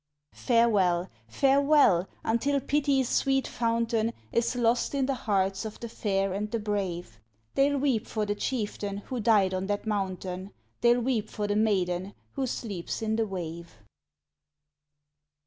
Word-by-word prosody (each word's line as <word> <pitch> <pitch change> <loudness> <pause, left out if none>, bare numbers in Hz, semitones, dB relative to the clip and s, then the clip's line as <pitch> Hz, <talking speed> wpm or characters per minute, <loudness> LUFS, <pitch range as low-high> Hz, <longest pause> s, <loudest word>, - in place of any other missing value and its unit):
Farewell! 200 -7 +2 0.2
farewell! 275 - +4 0.2
until 275 +5 +1
pity's 275 -1 +1
sweet 270 +1 +1
fountain 230 -1 0 0.2
Is 235 +2 +1
lost 240 +3 +1
in 275 -1 +1
the 275 - 0 0.2
hearts 195 0 +1
of 220 -1 -7
the 235 - -5
fair 195 -3 -1
and 210 +2 -2
the 230 - -1
brave, 190 - -3 0.3
They'll 280 +1 +3
weep 260 -5 0
for 215 -1 -1
the 205 - 0
Chieftain 205 -3 -3
who 255 - -4
died 205 -4 +3
on 185 +1 -2
that 205 +1 -2
mountain. 190 -2 -3 0.3
They'll 240 +1 +4
weep 230 -4 -1
for 210 - -3
the 205 0 0
Maiden 190 -3 0 0.2
who 270 -1 -2
sleeps 210 -5 -4
in 220 0 0
the 225 -1 0
wave. 170 -3 -6
215 Hz, 145 wpm, -28 LUFS, 195-245 Hz, 0.3 s, farewell